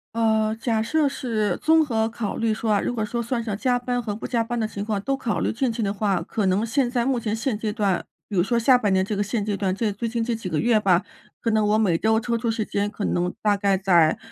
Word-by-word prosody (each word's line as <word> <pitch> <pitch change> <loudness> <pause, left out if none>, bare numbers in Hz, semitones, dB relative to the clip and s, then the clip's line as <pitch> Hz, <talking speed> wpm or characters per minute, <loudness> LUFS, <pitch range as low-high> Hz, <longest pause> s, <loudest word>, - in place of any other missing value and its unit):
呃， 220 -1 +2
假 225 -2 +1
设 300 +6 +1
是 225 -6 -1
综 320 0 +5
合 225 -5 0
考 225 -2 -4
虑 230 -1 0
说 220 +1 -3
啊， 205 - +2
如 - - -2
果 225 -3 -2
说 235 +3 -3
算 235 +1 -2
上 220 -3 -3
加 245 +2 +1
班 245 0 -2
和 210 - -3
不 210 - -6
加 235 -2 0
班 240 +1 -3
的 220 - 0
情 205 -2 -5
况， 210 -2 -2
都 275 +6 -1
考 235 -5 -2
虑 - - 0
进 245 +2 0
去 225 - -4
的 200 -2 0
话， 195 -3 0
可 205 +4 -2
能 190 +4 +1
现 245 +2 +1
在 240 -2 0
目 265 -1 +1
前 220 -2 -2
现 225 0 -1
阶 215 0 -2
段 205 -4 0 0.2
比 205 - -6
如 175 - +3
说 235 +4 +1
下 250 +2 +5
半 210 -5 0
年 190 0 +2
这 210 - -3
个 205 - 0
现 210 0 -2
阶 210 -1 -1
段 195 -1 -1
这 215 +3 -1
最 230 +3 -3
近 230 0 -2
这 230 +1 -1
几 220 -5 -6
个 155 -3 -1
月 235 -1 +3
吧， 185 -2 +3 0.4
可 230 - -1
能 215 -1 +2
我 210 +1 +3
每 195 -7 +2
周 220 +4 +2
抽 235 0 -1
出 230 0 -1
时 220 -1 -2
间 205 0 -1
可 210 - -4
能 180 0 0
大 210 -1 +3
概 200 -1 +1
在 175 -5 +3
220 Hz, 305 characters per minute, -24 LUFS, 205-235 Hz, 0.4 s, 综